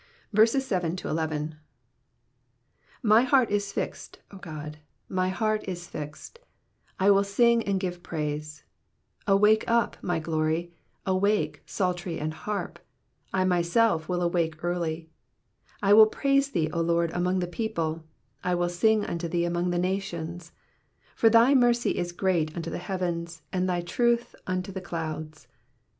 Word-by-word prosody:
7 210 -9 0 2.1
My 215 0 +6
heart 255 -2 +3
is 205 -1 0
fixed, - - -5
O 200 - -10
God, 150 -3 -8 0.3
my 185 0 0
heart 215 +2 0
is 175 -2 -5
fixed: 150 - -8 0.6
I 195 +2 +5
will 200 0 +5
sing 235 +4 +3
and 195 -1 +1
give 180 -2 -4
praise. 150 -2 -4 0.6
8 195 - +4
Awake 210 +2 +5
up, 235 -1 +1
my 175 -2 -1
glory; 160 +1 -1 0.3
awake, 200 +3 +1
psaltery 180 -2 -2
and 155 +1 -3
harp: 210 +5 -4 0.5
I 185 -1 +1
myself 175 0 +2
will 180 -1 0
awake 170 -2 -1
early. 165 -2 -2 0.7
9 200 - +3
I - - +9
will 215 +1 +9
praise 275 +4 +1
thee, 160 - -1
O 170 - 0
Lord, 170 0 +1
among 180 +2 0
the 180 - 0
people: 165 -4 -3 0.4
I 180 0 +1
will 175 0 0
sing 215 +4 +2
unto 170 0 -3
thee 170 +1 0
among 175 +1 0
the 175 - 0
nations. 175 -2 -3
ID - - -37
For 225 - +5
thy 230 +4 +6
mercy 240 -5 +3
is 175 0 -2
great 175 -4 0
unto 165 -1 -4
the - - -4
heavens, 170 -3 -4
and 185 0 0
thy 175 -1 0
truth. 235 +7 0
unto 185 +1 -2
the 190 0 -5
clouds. 155 -3 -6
180 Hz, 150 wpm, -27 LUFS, 170-205 Hz, 2.1 s, I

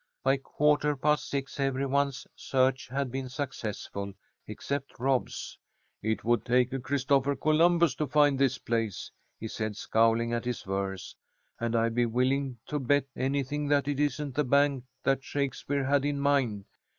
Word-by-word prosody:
By 135 +1 +3
quarter 150 +2 +1
past 150 +2 +1
six 140 0 -4
every 135 0 0
one's 140 0 0
search 130 -1 +1
had 135 0 -2
been 130 0 -4
successful 110 -7 -5 0.3
except 140 0 -4
Rob's. 130 +1 -1 0.4
"It 110 +1 -1
would 120 -1 +2
take 125 +2 +2
a 135 - -1
Christopher 140 +1 +1
Columbus 165 +1 +3
to 150 - -1
find 145 0 +3
this 135 -1 +2
place," 115 -6 -2 0.3
he 110 - -4
said, 110 -1 -4
scowling 115 +1 +2
at 120 0 -2
his 125 -1 -3
verse. 95 -1 -4 0.4
"And 115 0 -1
I'd 115 0 +2
be 120 0 +2
willing 130 +2 0
to 150 - -2
bet 145 +1 +2
anything 140 +2 -1
that 145 -1 +2
it 145 -1 -1
isn't 145 -1 -1
the 150 +4 +1
bank 140 -1 +2 0.2
that 135 0 +1
Shakespeare 140 0 -2
had 140 0 +2
in 145 0 -1
mind. 135 -8 +1
135 Hz, 160 wpm, -29 LUFS, 120-140 Hz, 0.4 s, By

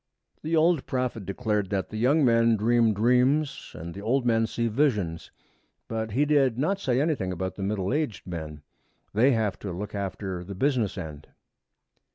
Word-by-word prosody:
The 160 +2 -1
old 160 -2 +3
prophet 125 -6 -2
declared 105 -2 -1
that 95 -2 -2
the 110 - -6
young 135 +6 +3
men 115 -1 +4
dream 115 +1 +3
dreams 125 +7 +1
and 85 +1 -7
the 100 - -8
old 120 +4 +1
men 115 -1 +2
see 115 +1 -1
visions, 105 - 0 0.6
but 110 -2 -3
he 140 +5 +3
did 140 -5 +3
not 190 +9 0
say 130 -8 +1
anything 140 - 0
about 95 +1 -3
the 100 - -8
middle 100 +2 -1
aged 145 - -2
men. 80 -4 -7 0.5
They 125 +6 +4
have 110 -4 -1
to 100 - -5
look 100 +4 -6
after 95 -2 -4
the 100 +2 -8
business 120 -4 0
end. 75 -5 -7
110 Hz, 175 wpm, -26 LUFS, 95-130 Hz, 0.6 s, men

